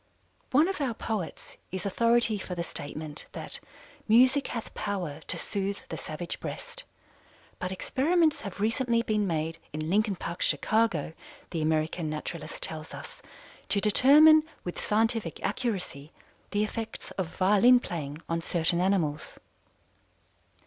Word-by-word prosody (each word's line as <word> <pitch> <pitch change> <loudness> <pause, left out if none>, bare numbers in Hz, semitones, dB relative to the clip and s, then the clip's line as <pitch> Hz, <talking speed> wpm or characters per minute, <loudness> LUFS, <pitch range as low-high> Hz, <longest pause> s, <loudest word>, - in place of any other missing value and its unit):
One 295 +6 +5
of 385 -5 -3
our 250 -5 0
poets 215 -6 -5
is 185 0 -4
authority 230 +1 +3
for 185 -1 -5
the 170 - -2
statement 150 -1 -5
that - - -4 0.5
"music 255 +5 +5
hath 230 - -5
power 180 -8 -3
to - - -2
sooth 200 0 -3
the - - -4
savage 165 +3 -5
breast," - - -5 0.7
but 180 0 -3
experiments 310 - +2
have 200 -2 -7
recently 230 +2 +1
been 215 -3 +1
made 165 0 -2
in 155 +2 -3
Lincoln 210 0 +2
Park, 175 0 -6
Chicago, 215 -9 +1 0.4
The 165 - -2
American 155 +1 0
Naturalist 325 - -5
tells - - -3
us, - - -9 0.5
to 200 - +5
determine 290 +9 +7 0.2
with 175 - -5
scientific 220 -4 +1
accuracy 195 - -3 0.4
the 205 0 +1
effects 225 +1 -5
of 180 -3 -4
violin 210 +6 +6
playing 155 - -5
on 165 0 -1
certain 170 +1 +1
animals. 175 -6 0
200 Hz, 135 wpm, -28 LUFS, 165-230 Hz, 0.7 s, determine